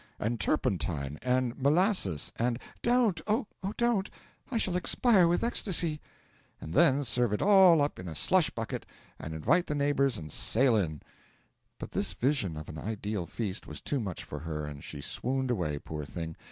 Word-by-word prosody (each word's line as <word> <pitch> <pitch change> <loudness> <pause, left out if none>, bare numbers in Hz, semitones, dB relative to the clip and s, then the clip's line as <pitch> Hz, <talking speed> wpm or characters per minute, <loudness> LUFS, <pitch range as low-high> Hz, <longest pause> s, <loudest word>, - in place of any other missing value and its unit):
and 115 +2 -2
turpentine! 80 - -1
and 125 -1 0
molasses! 150 - +2
and 120 0 0
' - - -27
'Don't 235 -8 +2
oh, 220 +4 +1 0.3
don't 235 -4 +1 0.4
I 250 - -1
shall 190 -5 0
expire 185 +1 +4
with 175 +1 +1
ecstasy! 175 -9 +1 0.3
' - - -35
'And 80 - -7
then 145 -2 +4
serve 120 -3 +1
it 105 - -1
all 190 -6 +6
up 145 - -3
in 90 - -7
a 80 - -6
slush 175 - +3
bucket, 115 -1 -5 0.3
and 80 0 -6
invite 155 - +2
the 150 - -2
neighbours 140 -3 +1
and 75 -4 -8
sail 125 - +3
in!' 80 -8 -1 0.7
But - - -8
this - - 0
vision 125 - 0
of 75 - -7
an 80 - -7
ideal 105 -3 -4
feast 105 -3 -4
was - - -7
too 145 - -2
much 95 -7 -5
for 75 - -7
her, 75 -1 -4
and 75 -1 -8
she 75 - -7
swooned 130 - -2
away, 85 -10 -1
poor 75 +1 -6
thing. 80 +2 -6
120 Hz, 180 wpm, -29 LUFS, -, 0.7 s, all